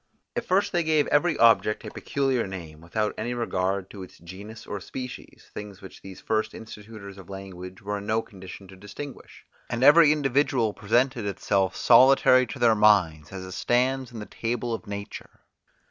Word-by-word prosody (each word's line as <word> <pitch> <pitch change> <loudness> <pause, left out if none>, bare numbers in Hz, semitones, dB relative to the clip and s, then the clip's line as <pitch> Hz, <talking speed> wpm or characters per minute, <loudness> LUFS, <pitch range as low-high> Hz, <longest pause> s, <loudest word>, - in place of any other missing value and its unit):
At 240 - -2
first 195 -1 +1
they 175 - +1
gave 155 -2 +2
every 155 +1 +2
object 115 -2 +3
a - - -7
peculiar 135 -5 -1
name, 80 -5 -9
without 105 +6 -2
any 120 +3 -3
regard 95 -4 -2
to 100 - -9
its 95 - -11
genus 100 +6 -11
or 100 - -6
species, 125 +5 -9
things 105 -2 -8
which 95 -3 -13
these 95 -1 -11
first 110 0 -2
institutors 105 -2 -11
of 95 - -14
language 95 -1 -9
were 105 0 -3
in 100 - -10
no 110 +1 +1
condition 95 -1 -12
to 95 - -12
distinguish; 105 +9 -10 0.2
and 120 +2 -2
every 150 +2 +7
individual 135 -6 +1
presented 120 +1 0
itself 100 -1 0
solitary 130 +1 +5
to - - -7
their 120 -2 +4
minds, 90 -8 +3
as 95 -1 -7
it 95 - -9
stands 130 +5 0
in 120 - -9
the 105 - -6
table 120 +1 -3
of 115 - -6
nature. 100 0 -8
110 Hz, 175 wpm, -25 LUFS, 95-125 Hz, 0.2 s, every